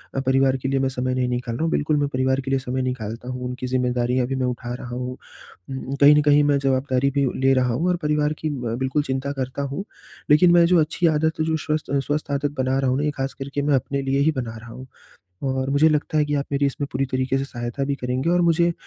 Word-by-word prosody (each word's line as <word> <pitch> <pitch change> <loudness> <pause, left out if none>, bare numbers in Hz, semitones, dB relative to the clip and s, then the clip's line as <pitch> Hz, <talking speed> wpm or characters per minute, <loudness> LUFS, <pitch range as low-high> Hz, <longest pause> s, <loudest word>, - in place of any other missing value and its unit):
अ, - - +1
परिवार 135 0 +2
के 130 +1 -3
लिए 135 0 +1
मैं 135 0 +1
समय 130 0 -2
नहीं 130 -1 0
निकाल 120 -1 -3
रहा 140 - -2
हूँ 165 - 0
बिल्कुल 150 +1 +1
मैं 145 0 +1
परिवार 130 +1 +1
के 135 0 -5
लिए 135 - +2
समय 130 0 -3
निकालता 120 -1 -4
हूँ 125 0 -5
उनकी 125 0 -4
ज़िम्मेदारियाँ 125 0 0
भी 135 - -2
मैं 130 -1 -1
उठा 120 -1 -3
रहा 125 - -7
हूँ। 125 0 -4 0.5
उम, 135 0 -5
कहीं 145 +1 +8
न 150 - +4
कहीं 145 0 +4
मैं 145 -1 +3
जवाबदारी 135 0 +1
भी 140 0 +1 0.2
ले 135 0 +4
रहा 125 -2 +2
हूँ 155 +9 0
और 180 - +2
परिवार 150 0 +1
की 155 - -2
ब 125 -5 -3
बिल्कुल 130 +3 0
चिंता 135 0 -2
करता 130 0 -4
हूँ, 140 +7 -3 0.5
लेकिन 175 +4 +6
मैं 170 -1 +6
जो 175 0 +4
अच्छी 160 +2 +1
आदत 160 0 +1
है 155 - +1
जो 160 0 0
स्वस्थ 155 0 -3
स्वस्थ 145 0 -2
आदत 140 0 0
बना 130 0 +1
रहा 135 -1 +1
हूँ 130 - +1
ना 145 - -1
ये 150 - +1
ख़ास 135 -1 -4
करके 140 +1 -4
मैं 145 0 +2
अपने 140 +2 -1
लिए 135 0 0
ही 155 +3 +3
बना 120 -5 -4
रहा 115 +1 -11
हूँ। 130 +2 -10 0.6
और 130 0 -1
मुझे 140 +3 +4
लगता 155 0 0
है 150 - +3
कि 145 - -3
आप 140 -1 -1
मेरी 140 0 +1
इसमें 140 +1 -2
पूरी 135 +1 0
तरीके 130 0 -1
से 135 - -1
सहायता 120 0 -4
भी 140 0 -1
करेंगे 130 +3 -2
और 175 0 +3
मुझे 170 0 +3
135 Hz, 265 wpm, -23 LUFS, 130-145 Hz, 0.6 s, कहीं